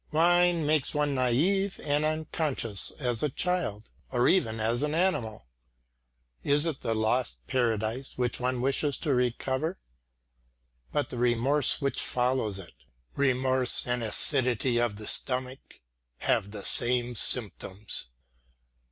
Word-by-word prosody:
Wine 175 +1 +3
makes 150 -1 0
one 150 -1 0
naive 165 +11 +1
and 145 0 +1
unconscious 155 - -1
as 125 -5 -1
a 150 - +1
child; 150 - -2 0.2
or 125 -1 +2
even 115 -12 +1
as 115 +3 0
an 150 +1 -1
animal. 145 - -1 1.0
Is 145 +2 +3
it 160 -5 -3
the 115 -2 -1
lost 110 +3 0
paradise 120 0 -2
which 125 -1 -1
one 125 0 -1
wishes 140 +2 0
to 150 -4 -1
recover? 130 +6 -1 1.1
But 145 - -2
the 120 - -5
remorse 125 +6 +1
which 140 0 0
follows 125 -5 -1
it? 90 -4 -10 0.4
Remorse 130 -2 +3
and 125 0 -1
acidity 120 +1 +3
of 120 -4 -1
the 105 +1 -8
stomach 130 +2 0 0.6
have 100 - 0
the 100 -1 -8
same 120 0 +1
symptoms. 105 - 0
130 Hz, 125 wpm, -28 LUFS, 120-150 Hz, 1.1 s, Wine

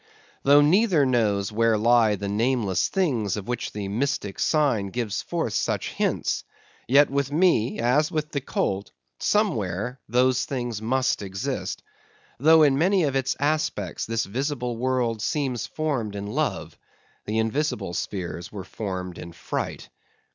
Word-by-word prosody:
Though 145 +1 +6
neither 170 0 +4
knows 110 -5 +1
where 115 0 +2
lie 115 -1 +4
the 100 0 -5
nameless 105 -2 +1
things 120 - 0
of 100 - -6
which 120 -1 -3
the 105 -2 -5
mystic 110 -1 -2
sign 140 -10 +2
gives 110 0 -3
forth - - -2
such - - -1
hints; - - -1 0.4
yet 140 +3 +5
with 140 0 0
me, 150 -8 +2
as 125 +6 +2
with 155 -1 -2
the 140 - -2
colt, 100 -6 -2 0.3
somewhere 125 - 0
those 125 +2 +3
things 120 -5 -3
must 130 +2 +1
exist. 95 -1 -4 0.6
Though 160 +3 +6
in 140 -2 +4
many 185 +2 +3
of 140 -3 0
its 135 -1 0
aspects 150 +2 -1
this 115 0 -1
visible 125 +1 -2
world 120 -2 0
seems 130 -3 -1
formed 135 -10 -2
in 100 0 -4
love, 105 - -3 0.5
the 110 +1 -1
invisible 110 - -1
spheres 85 -2 -4
were 100 -3 -6
formed 95 -4 -5
in 85 - -9
fright. 85 - -4
120 Hz, 145 wpm, -25 LUFS, 105-145 Hz, 0.6 s, Though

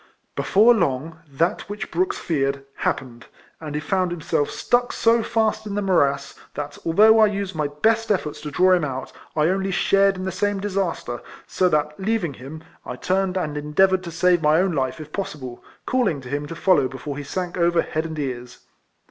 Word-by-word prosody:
Before 220 +5 +5
long, 160 - -1
that 165 +7 -1
which 205 -1 -6
Brooks 370 +3 0
feared, 140 -3 -1
happened; 120 -2 -3 0.3
and 150 -2 -6
he 150 - -1
found 185 +3 0
himself 160 -3 -1
stuck 245 0 0
so 230 0 +3
fast 220 -1 0
in 200 - -4
the 205 - 0
morass, 140 -7 +1 0.2
that 145 0 -5
although 215 +7 +5
I 215 - +7
used 200 -2 -3
my 155 -2 -1
best 220 +10 +1
eiForts 180 -7 -1
to 150 - -5
draw 185 +5 +3
him 175 -3 +2
out, 135 -2 -4 0.2
1 155 0 +3
only 190 +2 0
shared 195 +1 +3
in 185 0 -5
the 190 - -2
same 205 +2 -1
disaster; 190 - -2 0.2
so 185 -1 +1
that, 150 0 0
leaving 195 -6 -1
him, 140 +5 -10 0.2
I 125 - -6
turned 190 +5 0
and 150 -5 -2
endeavoured 185 +6 +2
to 170 - -6
save 175 +1 +3
my 155 +1 +4
own 190 0 +2
life 130 -2 -1
if 150 -1 -10
possible, 135 -11 -6 0.2
calling 230 - +1
to 125 - -10
him 145 +2 -3
to 165 - -7
follow 180 -7 +3
be 130 - -9
fore 145 +1 -6
he 145 - -5
sank 180 +5 -4
over 170 -1 +2
head 155 +1 -3
and 160 -1 -7
ears. 125 -4 -5
170 Hz, 200 wpm, -23 LUFS, 145-195 Hz, 0.3 s, I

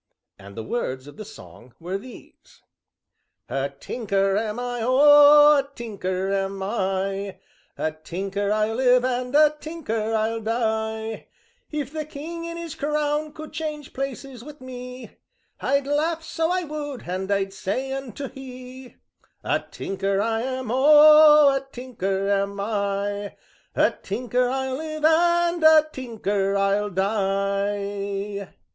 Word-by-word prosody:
And 100 +2 -13
the 110 - -4
words 130 - -3
of 145 - -13
the 215 - -6
song 130 - -14
were 180 +4 -4
these: 250 +4 -15 0.9
"A 135 +1 -1
tinker 195 - -1
I 215 +2 0
am, 215 +1 -4
O 290 +5 +6
a 275 0 -4
tinker 195 -4 -3
am 195 0 -2
I, 195 -1 -2 0.4
A 155 - -1
tinker 195 +6 -4
I'll 215 +1 +1
live, 250 -1 +4
and 250 +1 -2
a 305 0 +5
tinker 225 -10 -3
I'll 225 +1 -1
die; 220 -1 -2 0.4
If 295 -2 -4
the 310 -1 -3
King 320 +3 -7
in 335 0 -6
his 335 -3 -6
crown 300 +1 -1
would 310 0 -9
change 300 -2 -5
places 270 -2 -6
wi' 295 +1 -10
me 250 -1 -9 0.4
I'd 280 +1 +1
laugh 315 +3 0
so 325 0 -1
I 365 0 0
would, 295 -4 -6
and 190 +2 -3
I'd 195 -1 0
say 255 +8 -3
unto 270 0 -6
he: 255 -1 -11 0.5
'A - - -1
tinker 195 0 -2
I 225 +2 0
am, 255 -2 -3
O 300 +2 +8
a - - +1
tinker 195 -7 -3
am 200 0 0
I. 200 -1 -2 0.4
A - - +4
tinker 245 +4 -1
I'll 265 0 -2
live, 310 0 -3
and 345 +1 +3
a 315 -1 +7
tinker 205 -6 -1
I'll 200 +1 +1
die.'" 200 0 -2
235 Hz, 135 wpm, -24 LUFS, 200-290 Hz, 0.9 s, O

